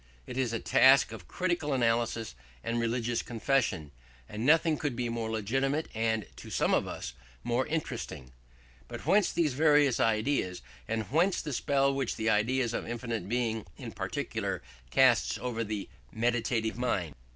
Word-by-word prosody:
It - - -7
is 130 -3 0
a 115 - -1
task 130 0 +5
of 105 -6 -9
critical 175 -5 -1
analysis 115 - 0 0.3
and 115 +1 -1
religious 115 0 0
confession: 115 - 0 0.4
and 105 +2 -5
nothing 160 +3 +4
could 145 -5 -2
be 120 0 -2
more 115 -1 -3
legitimate 135 +8 -1
and, 110 -2 0
to - - -10
some - - +1
of - - +2
us, - - -6 0.3
more 120 +2 0
interesting. 150 - -4 0.6
But - - -8
whence 195 +4 +4
these 160 -5 +1
various 145 -2 +4
ideas, 110 - +1 0.2
and 110 0 -1
whence 175 +6 +3
the 150 - -4
spell 140 +2 +2
which 135 -3 -1
the 110 0 +1
idea 120 +5 +2
of 120 - -3
infinite 115 -3 -4
Being 115 -3 -1
in - - -7
particular - - -3 0.3
casts - - +4
over 115 0 -3
the 105 -2 -4 0.2
meditative 115 -1 0
mind? 95 -11 -1
120 Hz, 155 wpm, -30 LUFS, 110-135 Hz, 0.6 s, task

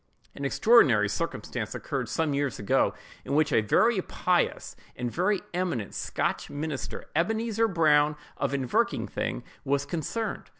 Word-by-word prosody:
An 140 - -5
extraordinary 135 - +5
circumstance 105 - -3
occurred - - -3
some 160 -3 0
years 140 -3 -1
ago, 100 - +1 0.3
in 140 - -2
which 155 0 +3
a - - +5
very 190 - +3
pious 180 0 0 0.2
and 120 -1 -3
very 185 - +1
eminent 175 - -2
Scotch - - -2
minister, 145 -1 -4
Ebenezer 225 +6 +1
Brown 155 -5 +3 0.2
of - - -1
Inverkeithing, 130 - -1 0.2
was 140 +1 0
concerned. 175 +9 -3
150 Hz, 130 wpm, -27 LUFS, 135-185 Hz, 0.3 s, extraordinary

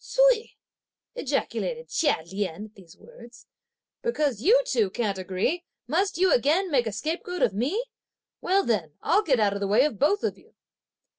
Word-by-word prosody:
"Ts'ui!" - - +2 0.6
ejaculated 485 0 -3
Chia 290 - +1
Lien 195 +1 -4
at 215 - -16
these 180 -5 -17
words, 235 +1 -15 0.6
"because 295 - -1
you 450 - +5
two 230 - +1
can't 200 -1 -2
agree, 190 - -1 0.2
must 385 -3 0
you 370 +1 +4
again 320 +9 +2
make 250 -5 +2
a - - -2
scapegoat 325 - -3
of - - +2
me! 285 - -1 0.6
Well 390 +2 +2
then, 185 -10 -1
I'll 415 - +3
get 275 - +1
out 205 -2 +2
of 200 - -4
the 200 - -1
way 220 +7 +4
of 285 -9 -3
both 400 +9 +2
of - - -2
you!" - - -25
265 Hz, 170 wpm, -26 LUFS, -, 0.6 s, you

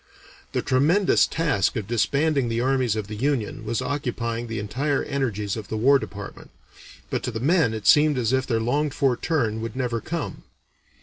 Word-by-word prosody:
The - - 0
tremendous 165 +10 +3
task 150 - 0
of 110 -4 -2
disbanding 135 +4 +1
the 115 0 -1
armies 130 -3 +1
of 110 -2 -3
the 105 - -8
Union 120 -3 -1
was 115 +3 -2
occupying 120 -4 -3
the 115 0 -4
entire 135 +8 -1
energies 110 -8 -2
of 110 -3 -7
the 110 - -3
War 135 +5 +5
Department, 100 -5 -8 0.6
but - - -1
to - - -3
the 110 -2 -4
men 145 -3 +2
it 110 -2 -7
seemed 150 -1 +5
as 120 0 0
if 130 0 +1
their 115 -3 +1
longed 140 +5 0
for 135 -3 +2
turn 115 -8 -1
would 115 +1 -5
never 120 -3 -2
come. 165 -2 -4
125 Hz, 185 wpm, -24 LUFS, 110-140 Hz, 0.6 s, War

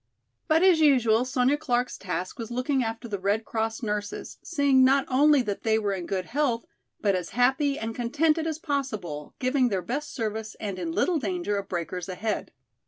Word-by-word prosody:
But 320 +1 +4
as 365 -4 +6
usual 250 -6 +4
Sonya 260 +2 +2
Clark's 250 -5 0
task 185 +1 -4
was 230 -1 -5
looking 255 +2 0
after 225 +1 -4
the 205 -3 -4
Red 205 +4 0
Cross 225 +1 -2
nurses, 210 -1 -4
seeing 280 -5 +3
not 270 +1 +4
only 285 +1 +4
that 205 -3 -3
they 220 -1 +2
were 205 -2 0
in 180 -3 -4
good 185 -2 -2
health, 255 -4 0 0.4
but 200 -2 +2
as 180 -2 -2
happy 270 +3 +3
and 225 0 -4
contented 305 +7 +1
as 315 -2 -2
possible, 215 - -4
giving 255 0 +2
their 190 -4 -1
best 290 +4 -3
service 220 -1 -4
and 200 -3 -4
in 170 -2 -3
little 335 - +1
danger 345 - -2
of 200 -1 -4
breakers 175 +1 -4
ahead. 210 +4 -3
235 Hz, 185 wpm, -26 LUFS, 205-280 Hz, 0.4 s, as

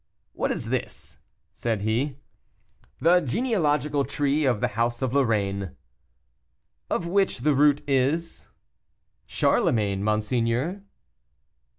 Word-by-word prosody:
"What - - -1
is - - -4
this?" - - -5 0.3
said 115 -3 -2
he. 125 +6 -1 0.8
"The 175 +2 +5
genealogical 150 - 0
tree 145 +2 0
of 120 -5 +2
the - - 0
house 120 +3 -1
of 130 -1 -1
Lorraine." 100 -8 0 1.1
"Of - - -1
which 190 -6 +1
the 150 +3 +3
root 145 +1 +3
is?" 140 +5 -1 0.8
"Charlemagne, 100 -3 +1
monseigneur." 115 - 0
135 Hz, 100 wpm, -25 LUFS, 115-150 Hz, 1.1 s, The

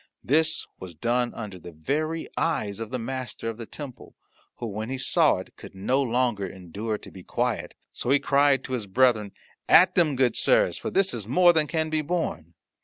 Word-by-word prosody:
This 160 +3 +2
was 90 -3 -9
done 120 +7 0
under 105 -5 -7
the 85 - -10
very 155 - -2
eyes 110 -12 -1
of 115 -1 -5
the 130 - -3
Master 125 -1 -4
of 115 - -6
the 115 -2 -8
Temple, 140 -5 -9 0.4
who, - - -6
when 110 +1 -4
he 135 - -3
saw 130 - +3
it, - - -9
could - - -12
no 125 +8 +1
longer 120 -5 0
endure 95 +5 -5
to - - -13
be 95 - -11
quiet. - - -2 0.2
So - - -4
he 140 - +6
cried 140 -1 +3
to 130 - -6
his 115 -5 -3
brethren, 110 -1 +2 0.4
"At 185 +2 +7
them, 160 -6 +2
good 130 -1 +2
sirs, - - +3
for - - -4
this 195 -1 +2
is 110 -4 -5
more 175 +7 +5
than 155 -2 +2
can 160 -1 -1
be 155 0 +1
borne." 115 - -3
125 Hz, 200 wpm, -26 LUFS, 105-150 Hz, 0.4 s, At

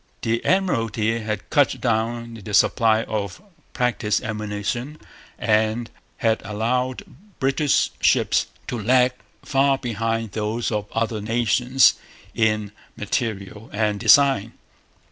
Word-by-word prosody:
The 115 +1 0
Admiralty 115 - +1
had 105 -2 -4
cut 145 -3 +3
down 115 0 -1
the 105 0 -2
supply 110 0 +3
of 100 -4 -4 0.3
practice 115 -4 0
ammunition 110 +6 -4 0.4
and 110 +1 0 0.3
had 110 -1 +1
allowed 125 +4 -2 0.4
British 135 +1 +1
ships - - +2 0.2
to 120 - -4
lag 125 +3 +4 0.3
far 135 0 +2
behind 115 -2 -2
those 110 +2 -2
of 105 -1 -3
other 115 -1 -1
nations 120 +4 +3 0.4
in 105 -2 0 0.3
material 105 -1 -3
and 105 -1 0
design. 135 -4 +4
115 Hz, 105 wpm, -22 LUFS, 105-125 Hz, 0.4 s, lag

